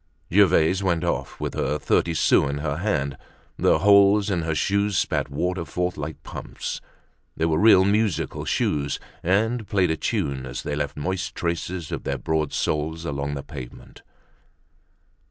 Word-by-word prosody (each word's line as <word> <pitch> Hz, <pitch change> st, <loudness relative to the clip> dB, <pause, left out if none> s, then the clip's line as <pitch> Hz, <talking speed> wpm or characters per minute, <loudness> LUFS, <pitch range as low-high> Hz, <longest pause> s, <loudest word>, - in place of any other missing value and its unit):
Gervaise 95 Hz, -2 st, +4 dB
went 85 Hz, -3 st, 0 dB
off 85 Hz, -, -2 dB
with -, -, -3 dB
her 75 Hz, -, -1 dB
thirty 85 Hz, +2 st, +1 dB
sous 70 Hz, -, +3 dB
in 70 Hz, -, -2 dB
her 75 Hz, 0 st, -2 dB
hand. 75 Hz, -8 st, -1 dB, 0.4 s
The -, -, +4 dB
holes 100 Hz, +2 st, +5 dB
in 90 Hz, -3 st, 0 dB
her 80 Hz, -1 st, -1 dB
shoes 100 Hz, +2 st, +1 dB
spat -, -, 0 dB
water 90 Hz, +5 st, -2 dB
forth 90 Hz, +1 st, -2 dB
like 75 Hz, +1 st, -6 dB
pumps; -, -, -6 dB, 0.6 s
they 80 Hz, -, +1 dB
were 80 Hz, -1 st, +1 dB
real 95 Hz, -3 st, +6 dB
musical 105 Hz, -1 st, 0 dB
shoes, 70 Hz, -1 st, 0 dB, 0.2 s
and 110 Hz, +5 st, +1 dB
played 95 Hz, -6 st, +2 dB
a 80 Hz, -, -1 dB
tune 65 Hz, -3 st, -2 dB
as -, -, -5 dB
they -, -, -2 dB
left -, -, -3 dB
moist 95 Hz, +6 st, -3 dB
traces 85 Hz, 0 st, -3 dB
of -, -, -4 dB
their -, -, -2 dB
broad 80 Hz, -2 st, -1 dB
soles 80 Hz, +2 st, -2 dB
along 70 Hz, -1 st, -3 dB
the 70 Hz, -, -5 dB
pavement. 65 Hz, -4 st, -10 dB
85 Hz, 160 wpm, -24 LUFS, 75-100 Hz, 0.6 s, real